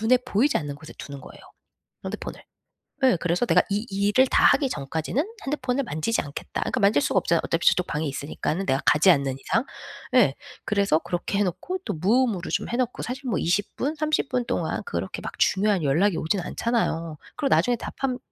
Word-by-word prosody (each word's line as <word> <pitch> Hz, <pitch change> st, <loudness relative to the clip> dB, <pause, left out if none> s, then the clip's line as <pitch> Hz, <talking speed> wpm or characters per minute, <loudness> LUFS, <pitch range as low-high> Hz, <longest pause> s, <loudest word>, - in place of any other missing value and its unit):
눈에 225 Hz, +4 st, +4 dB
보이지 255 Hz, +5 st, +2 dB
않는 145 Hz, -3 st, -3 dB
곳에 155 Hz, +2 st, -12 dB
두는 140 Hz, -1 st, -8 dB
거예요 -, -, -13 dB, 0.6 s
핸드폰을. -, -, -6 dB, 0.6 s
예 255 Hz, -8 st, +5 dB
그래서 175 Hz, +7 st, +1 dB
'내가 -, -, +5 dB
이 205 Hz, +3 st, -1 dB
일을 205 Hz, +6 st, +3 dB
다 -, -, +3 dB
하기 275 Hz, -1 st, +4 dB
전까지는 160 Hz, -, -2 dB, 0.2 s
핸드폰을 270 Hz, -1 st, -1 dB
만지지 225 Hz, -, -1 dB
않겠다.' 145 Hz, -1 st, -6 dB
그러니까 -, -, -1 dB
만질 200 Hz, -7 st, +4 dB
수가 -, -, 0 dB
없잖아요 170 Hz, -1 st, +1 dB
어차피 165 Hz, -, -1 dB
저쪽 180 Hz, -, +4 dB
방에 155 Hz, 0 st, -2 dB
있으니까는 150 Hz, +6 st, -3 dB
내가 135 Hz, -4 st, +1 dB
가지 155 Hz, +5 st, +6 dB
않는 140 Hz, -4 st, +1 dB
이상. 225 Hz, -, 0 dB, 0.5 s
예, -, -, +5 dB, 0.3 s
그래서 200 Hz, -6 st, +2 dB
그렇게 175 Hz, +4 st, -3 dB
해 205 Hz, -, +4 dB
놓고 360 Hz, -, -3 dB
또 -, -, -2 dB
무음으로 200 Hz, +2 st, +1 dB
좀 -, -, -1 dB
해 240 Hz, -, -1 dB
놓고 250 Hz, -1 st, -1 dB
사실 260 Hz, +1 st, -5 dB
뭐 190 Hz, -, 0 dB
20 185 Hz, +6 st, 0 dB
분, 290 Hz, +4 st, -2 dB
30 305 Hz, -2 st, 0 dB
분 250 Hz, -1 st, 0 dB
동안 -, -, -2 dB
그렇게 470 Hz, -, -4 dB
막 -, -, -7 dB
중요한 200 Hz, -2 st, +2 dB
연락이 165 Hz, +7 st, +2 dB
오진 175 Hz, +5 st, 0 dB
않잖아요. 170 Hz, -6 st, -1 dB, 0.2 s
그리고 285 Hz, -3 st, +1 dB
나중에 245 Hz, -1 st, +3 dB
답하면 255 Hz, +2 st, -3 dB
200 Hz, 415 characters per minute, -25 LUFS, 160-250 Hz, 0.6 s, 가지